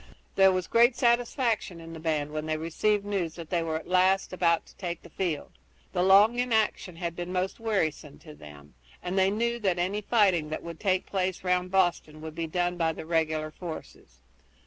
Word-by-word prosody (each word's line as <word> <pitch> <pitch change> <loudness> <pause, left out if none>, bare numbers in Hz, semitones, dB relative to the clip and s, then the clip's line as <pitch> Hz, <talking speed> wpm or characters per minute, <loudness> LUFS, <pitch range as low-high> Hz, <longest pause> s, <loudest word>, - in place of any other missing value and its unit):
There 195 0 +6
was 185 -1 -1
great 235 +5 +4
satisfaction 235 - +1
in 165 0 -10
the 160 - -8
band 155 -2 -1
when 155 0 -4
they 155 0 0
received 200 +6 0
news 190 -6 -2
that 165 -2 -9
they 175 -2 +1
were 160 -1 -2
at 160 - -10
last 185 +1 +2
about 170 -2 +2
to - - -19
take 175 -2 -5
the 170 - -14
field. 170 -5 -3 0.4
The 180 - +1
long 200 +6 +5
inaction 220 -7 0
had 170 0 -4
been 175 +1 -5
most 185 +1 -2
wearisome 160 -10 -2
to 155 - -12
them, 75 - -14 0.3
and 180 +1 -3
they 190 0 +4
knew 235 +3 -1
that 190 -5 0
any 190 +4 -1
fighting 195 -8 +2
that 155 - -5
would 170 -1 -8
take 185 -2 +1
place 185 -2 -2
round 180 0 +1
Boston 175 -5 +1
would 160 0 -7
be 165 0 -3
done 175 +2 -1
by 165 -1 +1
the 160 - -8
regular 155 -2 0
troops. 160 - -9
180 Hz, 200 wpm, -28 LUFS, 160-195 Hz, 0.4 s, There